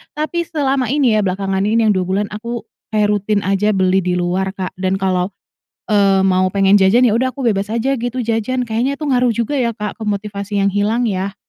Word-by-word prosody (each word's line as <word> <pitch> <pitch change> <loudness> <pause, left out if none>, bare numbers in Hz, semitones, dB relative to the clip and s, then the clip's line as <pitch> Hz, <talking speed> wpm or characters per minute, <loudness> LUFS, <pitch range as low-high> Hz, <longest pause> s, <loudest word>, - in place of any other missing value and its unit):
Tapi, 310 +3 -2
selama 275 -4 0
ini 270 -6 +2
ya, 210 - +1
belakangan 195 +1 -1
ini 225 +2 +2
yang - - +4
2 185 -1 0
bulan 200 +2 0
aku 235 +1 -5 0.3
kayak 210 -1 +2
rutin 205 0 0
aja 195 +2 +1
beli 190 0 +2
di 180 0 0
luar 180 +2 -1
Kak, 185 -2 -5
dan 185 0 0
kalau, 190 0 -1 0.6
eee, 195 -2 +4
mau 185 0 +3
pengen 195 0 +2
jajan, 195 +6 +4
ya 225 - +3
udah 255 +3 +1
aku 275 - -5
bebas 200 -3 +1
aja 235 +5 0
gitu 245 +1 -3
jajan. 230 +3 -1
Kayaknya 240 +5 -1
tuh 290 -1 -3
ngaruh 250 -1 +3
juga 260 +4 -1
ya 235 -2 0
Kak 210 +1 -5
ke - - -5
motivasi 205 0 -3
yang 200 - +2
hilang 215 +4 +1
ya? 195 -2 -2
210 Hz, 215 wpm, -17 LUFS, 190-235 Hz, 0.6 s, yang